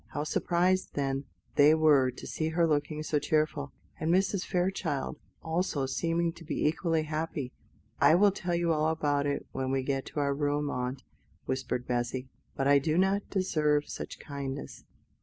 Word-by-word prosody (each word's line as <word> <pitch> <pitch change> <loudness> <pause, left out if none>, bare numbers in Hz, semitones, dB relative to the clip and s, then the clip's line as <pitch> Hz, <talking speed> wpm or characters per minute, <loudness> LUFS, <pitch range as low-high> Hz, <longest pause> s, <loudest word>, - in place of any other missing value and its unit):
How 145 - -1
surprised, 180 +4 +1
then, 135 -1 -1 0.3
they 150 +2 +7
were 150 -5 +5
to 125 - -9
see 160 0 -2
her 170 +1 +2
looking 155 0 0
so 150 -1 +1
cheerful, 150 -2 0 0.3
and 160 - -1
Mrs. 190 +1 +2
Fairchild 175 -6 -1 0.2
also 160 -4 0
seeming 165 +4 0
to 170 - -13
be 155 - -2
equally 160 +1 +1
happy. 155 -4 -3 0.5
"I 160 - +6
will 200 +3 +5
tell 175 -2 -2
you 170 -1 +2
all 155 0 +1
about 145 -3 +1
it 140 - -2
when 130 0 -2
we 135 0 0
get 135 0 -2
to - - -4
our 140 -1 +1
room, 145 0 0
aunt," 125 +1 -3 0.4
whispered 130 -1 -2
Bessy; 125 +1 -2 0.3
"but 135 - 0
I 140 0 +6
do 155 +3 0
not 195 +2 +2
deserve 150 -6 +1
such - - -6
kindness. 140 -1 -6
150 Hz, 170 wpm, -30 LUFS, 140-165 Hz, 0.5 s, they